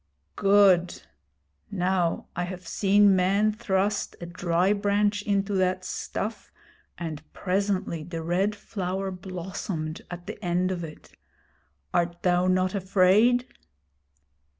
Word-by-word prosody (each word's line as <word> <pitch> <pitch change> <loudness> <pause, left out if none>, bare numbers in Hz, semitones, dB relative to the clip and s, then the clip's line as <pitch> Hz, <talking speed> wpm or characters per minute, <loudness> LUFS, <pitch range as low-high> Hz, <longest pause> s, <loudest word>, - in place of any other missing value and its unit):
'Good! 195 -3 +4 0.7
Now 180 -2 0
I 180 - -1
have 180 -1 -8
seen 200 0 +4
men 195 +4 +3
thrust 200 -1 -1
a 175 - -6
dry 175 +2 +1
branch 205 0 +1
into 200 0 0
that 185 -1 +1
stuff, 215 +3 -5 0.5
and 160 -3 -5
presently 190 -3 -1
the 165 0 -6
Red 190 +5 0
Flower 195 -2 -4
blossomed 180 -3 -5
at 175 0 -8
the - - -8
end 180 +1 +1
of 175 -2 -3
it. 155 -2 -10 0.8
Art 170 0 0
thou 180 0 +3
not 185 0 +2
afraid?' 200 +6 +3
185 Hz, 115 wpm, -26 LUFS, 175-200 Hz, 0.8 s, Good